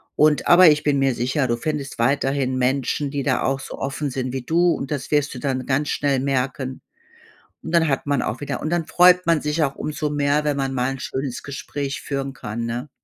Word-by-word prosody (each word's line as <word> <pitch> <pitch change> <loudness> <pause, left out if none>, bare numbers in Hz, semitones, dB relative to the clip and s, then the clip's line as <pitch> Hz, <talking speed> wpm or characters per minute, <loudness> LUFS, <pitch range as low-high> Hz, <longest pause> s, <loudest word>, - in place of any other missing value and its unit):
Und 150 -1 +3
aber 175 0 +8
ich 150 0 +2
bin 145 -2 +2
mir 135 -1 +2
sicher, 130 +3 0
du 120 - 0
findest 140 0 -4
weiterhin 135 +1 +1
Menschen, 135 +2 0
die 140 -2 -2
da - - +1
auch 135 0 0
so - - -8
offen 140 +2 -3
sind 130 -1 -3
wie 135 - -3
du 170 +6 +3
und 135 - -5
das 145 -2 -4
wirst 145 -1 +1
du - - -6
dann 130 -1 -2
ganz 140 +2 0
schnell 140 -2 +1
merken. 130 -1 -2 0.8
Und - - -6
dann 160 -1 +4
hat 135 0 -1
man 140 -2 +1
auch - - -3
wieder 145 - -4
und 155 - -3
dann 170 -2 0
freut 180 0 +5
man 165 -2 +3
sich 150 +2 0
auch 140 -1 -2
umso 150 0 -3
mehr, 145 0 +1
wenn 145 -1 0
man 135 -1 -1
mal 125 +1 0
'n 135 - -7
schönes 130 -2 -4
Gespräch 140 0 -5
führen 135 -1 -3
kann, 115 -2 -5
ne? 120 +4 -4
140 Hz, 225 wpm, -22 LUFS, 130-150 Hz, 0.8 s, aber